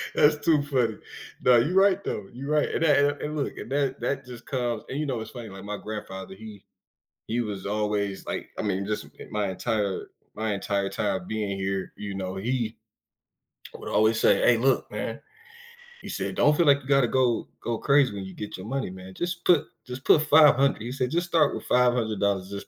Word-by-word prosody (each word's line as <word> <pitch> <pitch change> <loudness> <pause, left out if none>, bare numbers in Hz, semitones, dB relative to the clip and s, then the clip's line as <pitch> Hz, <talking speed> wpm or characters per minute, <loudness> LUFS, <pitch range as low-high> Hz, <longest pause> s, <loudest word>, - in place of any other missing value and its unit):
That's 150 +1 +5
too 155 -2 +4
funny. 125 -6 0 0.4
No, 125 -1 +6
you 135 +10 +2
right 195 0 +4
though, 105 - -3
you 135 +4 -7
right, 150 -1 +2
and - - -1
that 150 -3 +5
and 145 0 +2
and 150 +1 -3
look, 140 - -3
and - - -8
that 140 -2 0
that 135 -1 -2
just 125 -1 -10
comes, 120 -4 -2
and 140 - -3
you 155 - -1
know 130 -5 -2
it's - - -8
funny 120 -3 -8
like 95 0 -10
my 105 0 -4
grandfather, 95 -3 -7
he 105 -1 -11 0.6
he 120 +2 0
was 105 -4 -5
always 105 -1 -1
like, - - -4
I - - +1
mean 100 -1 -1
just 105 0 -3
i - - -8
my 105 -2 -1
entire 100 0 -2 0.3
my 110 -1 -1
entire 100 0 -1
time 95 -4 -2
being 105 -3 -2
here, 95 0 -3
you 100 -1 -6
know, 95 0 -4
he 115 +2 -2 1.0
would - - -8
always 110 +1 +3
say, 125 - +5
"Aye, - - +1
look, 130 +3 +2
man," - - -4 0.8
he - - -10
said, - - -3
"Don't 150 +1 +4
feel 170 - +3
like 140 -1 +5
you 130 - -14
gotta 135 -3 +4
go 125 -1 +1
go 120 -1 -2
crazy 140 -4 +3
when 100 - -5
you 95 - -9
get 105 +3 -7
your 95 +2 -8
money, 135 -2 -2
man, 95 0 -10
just 175 - -4
put 175 -5 +5 0.2
just 125 +1 -8
put 150 - +6
500,” 150 -5 +5
he 120 - -5
said, 125 -1 -2
"Just 175 +2 0
start 160 -4 +3
with - - -6
$500, 110 -6 +1
just 100 0 -7
115 Hz, 210 wpm, -26 LUFS, 100-140 Hz, 1.0 s, No